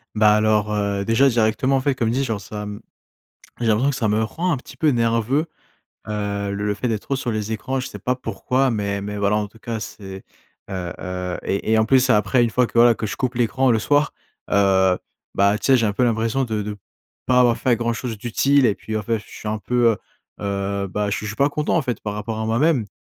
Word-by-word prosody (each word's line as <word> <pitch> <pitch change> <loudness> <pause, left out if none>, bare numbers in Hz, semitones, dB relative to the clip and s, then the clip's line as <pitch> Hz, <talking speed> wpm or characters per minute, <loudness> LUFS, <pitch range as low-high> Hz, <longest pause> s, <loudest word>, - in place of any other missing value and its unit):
Bah, 105 0 +5
alors, 105 0 +2
heu, 100 -1 -1
déjà, 115 +6 +4
directement, 120 +2 +2
en 130 - 0
fait, 140 -1 +1
comme 115 -2 0
dit, 135 +3 0
genre, 110 -5 -2
ça, 105 +1 -7
mmh, 105 +2 -7 0.8
j'ai 115 - -1
l'impression 115 +6 +3
que 135 - -1
ça 115 -5 0
me 110 +2 +1
rend 170 +9 -1
un - - -1
petit 130 +1 -13
peu 155 - +1
nerveux, 115 +5 +1 0.6
heu, 100 -1 -2
le 105 +1 -1
fait 120 +5 -2
d'être 110 -3 -2
trop 135 - -2
sur 125 -2 -3
les 110 0 -2
écrans. 130 +4 -2
Je 125 - -5
sais 105 - -9
pas 125 +6 -1
pourquoi, 130 +3 0
mais 100 -2 -2
mais 105 0 -5
voilà, 100 +1 +2
en 105 -1 0
tout 110 +3 -19
cas, 115 0 -4
c'est 95 -2 -8 0.5
heu 90 -2 -4
heu 90 -1 -4
et 100 +3 -1
et 110 - +5
en 110 - +4
plus 130 +1 +3
après 120 +2 +3
une 120 - +3
fois 125 +3 +2
que - - -15
voilà, 120 0 +7
que 110 - -6
je - - -4
coupe 130 -1 -2
l'écran 125 +2 +2
le 115 - +3
soir, 145 +6 +1 0.4
heu, 95 -2 +4 0.4
bah, 100 +1 +3
tu 100 - -4
sais, 135 -1 +6
j'ai 115 - +1
un 105 - 0
peu 125 - -1
l'impression 115 +2 +1
de 110 -3 -2
de 105 0 -5 0.5
pas 125 0 +4
avoir 120 -2 +4
fait 120 -3 +2
grand 120 0 -1
chose 115 -1 -4
d'utile 135 +6 +2
et 110 -4 +3
puis 110 +1 -5
en 105 - -2
fait, 115 +1 -1
je 105 - -13
suis 105 - -8
un 110 - -1
peu, 120 +2 +2
heu 105 - -5 0.4
heu, 100 0 -2
bah, 105 +2 -2
je 105 - -1
je 105 - -5
suis 105 - -5
pas 140 +1 +3
content, 150 +3 0
en 160 - +2
fait, 125 -2 -3
par 105 -1 -4
rapport 110 +1 -4
à 110 - -2
moi-même 125 +1 +2
110 Hz, 250 wpm, -22 LUFS, 105-125 Hz, 0.8 s, voilà